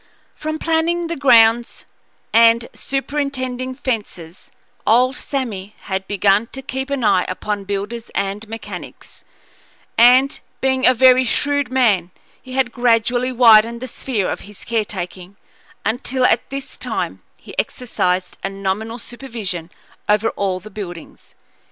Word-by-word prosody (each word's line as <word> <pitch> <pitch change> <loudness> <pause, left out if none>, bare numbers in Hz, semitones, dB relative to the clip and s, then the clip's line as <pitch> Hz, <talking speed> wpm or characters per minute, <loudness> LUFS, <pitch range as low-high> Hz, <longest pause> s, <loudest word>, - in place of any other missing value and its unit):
From 310 0 -4
planning 330 +2 0
the 335 0 -3
grounds 235 -4 +4 0.5
and 230 +1 +5
superintending 265 -2 -3
fences, 205 - -5 0.4
old 250 +4 +4
Sammy 215 -9 -4
had 190 0 -4
begun 205 +2 +2
to 270 - -7
keep 265 +1 -4
an 280 -3 -2
eye 185 -4 +4
upon 200 +2 -3
builders 205 +4 -4
and 200 +2 -2
mechanics; 225 0 -9 0.8
and, 255 +4 +6 0.2
being 265 0 +2
a 255 - +5
very 255 +1 +6
shrewd 285 +2 0
man, 215 -10 +2 0.3
he 255 - -11
had 260 -2 +1
gradually 245 +1 +2
widened 230 -1 +6
the 255 - -6
sphere 225 -5 -2
of - - -3
his 205 0 -10
caretaking, 195 -4 -4 0.5
until, 250 +3 0
at - - +2
this 275 0 -7
time, - - -3 0.2
he - - -13
exercised 185 -7 -1
a 195 - -1
nominal 195 +4 -3
supervision 225 -9 -6 0.4
over 210 +1 +3
all 190 -2 -2
the 215 +3 -12
buildings. 175 -6 -9
235 Hz, 130 wpm, -19 LUFS, 200-260 Hz, 0.8 s, and